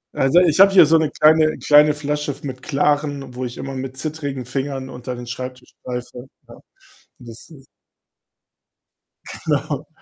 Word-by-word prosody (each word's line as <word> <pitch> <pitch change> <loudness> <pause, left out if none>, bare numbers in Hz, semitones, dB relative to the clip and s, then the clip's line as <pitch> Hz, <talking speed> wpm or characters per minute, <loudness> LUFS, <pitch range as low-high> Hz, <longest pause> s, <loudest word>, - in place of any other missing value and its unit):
Also, 135 +6 +4
ich 170 -1 +2
habe 195 0 +8
hier 180 -4 +7
so 160 +1 +4
'ne 155 -2 0
kleine 155 0 +3
kleine 150 0 +4
Flasche 150 0 -3
f 140 - -17
mit 130 -2 -7
Klarem, 145 -1 -1
wo 125 +1 -5
ich 120 - -7
immer 135 0 -6
mit 130 0 -6
zittrigen 145 -4 -5
Fingern 135 +1 -4
unter 125 0 -7
den 120 - -8
Schreibtisch 125 +1 -8
greife, 125 0 -7 0.2
ja. - - -13 0.7
Und 120 - -14
das 115 +6 -13
ist 135 -4 -16 1.8
genau, - - -2
135 Hz, 160 wpm, -20 LUFS, 130-150 Hz, 1.8 s, habe